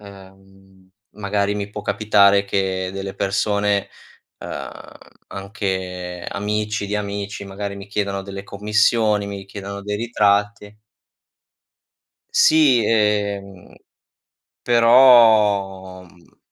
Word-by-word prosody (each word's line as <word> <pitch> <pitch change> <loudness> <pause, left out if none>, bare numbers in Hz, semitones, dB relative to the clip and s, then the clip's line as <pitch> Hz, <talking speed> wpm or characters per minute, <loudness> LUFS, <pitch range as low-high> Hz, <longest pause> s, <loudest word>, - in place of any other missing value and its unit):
Ehm, 95 -1 -17 0.2
magari 100 0 -2
mi 100 0 -5
può 105 0 -7
capitare 100 -1 +3
che 95 -1 -2
delle 95 0 -6
persone, 100 0 -1 0.5
ehm - - -7 0.6
anche 95 -3 -5
amici 105 0 -3
di 105 +1 -2
amici, 100 0 -5
magari 100 +1 -6
mi 100 - -10
chiedano 100 -1 -3
delle 100 0 -8
commissioni, 105 +1 +1
mi 100 -1 -7
chiedono 100 0 -8
dei 105 0 -4
ritratti. 105 -1 -1 1.5
Sì 155 - +4
ehm, 100 -3 -1 0.9
però 110 -6 +4
mhmm... 85 -1 -23
100 Hz, 95 wpm, -20 LUFS, 95-105 Hz, 1.5 s, Sì